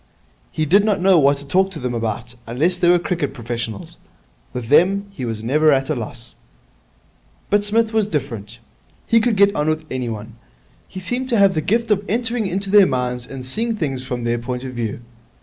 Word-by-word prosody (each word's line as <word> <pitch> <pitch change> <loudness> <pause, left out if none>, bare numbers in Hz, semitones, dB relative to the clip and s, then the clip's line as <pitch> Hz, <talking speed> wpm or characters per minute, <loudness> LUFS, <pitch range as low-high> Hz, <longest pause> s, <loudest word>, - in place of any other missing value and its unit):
He 155 - -1
did 195 +7 +4
not 210 -2 +1
know 185 -1 +5
what 140 0 +4
to 140 - -8
talk 190 +6 +2
to 180 -5 -7
them 125 -1 -3
about, 115 +1 -3
unless 160 +10 0
they 175 -1 +4
were 175 - +6
cricket 170 -4 -2
professionals. 115 -3 -6 0.5
With 125 -2 -6
them 195 +7 +4
he 135 -10 -6
was 110 -2 -4
never 150 +6 +3
at 135 +1 +1
a - - 0
loss. 115 0 -5 1.2
But 205 0 +3
Psmith 220 +2 +1
was 220 -2 +2
different. 115 - -4 0.5
He 230 0 +4
could 235 -1 +1
get 200 0 +4
on 150 -3 0
with 155 0 -1
anyone. 115 -3 -5 0.5
He 190 - -8
seemed 245 +7 -2
to 235 - +2
have 200 -1 +5
the 155 - 0
gift 230 +6 0
of 205 -1 +2
entering 230 0 0
into 195 +1 -2
their 205 -2 +7
minds 125 -2 -2
and 135 -2 -7
seeing 225 - -1
things 135 -9 -3
from 125 -2 -4
their 120 0 0
point 125 +1 -4
of 130 -1 -6
view. 115 -2 -4
150 Hz, 200 wpm, -20 LUFS, 125-200 Hz, 1.2 s, their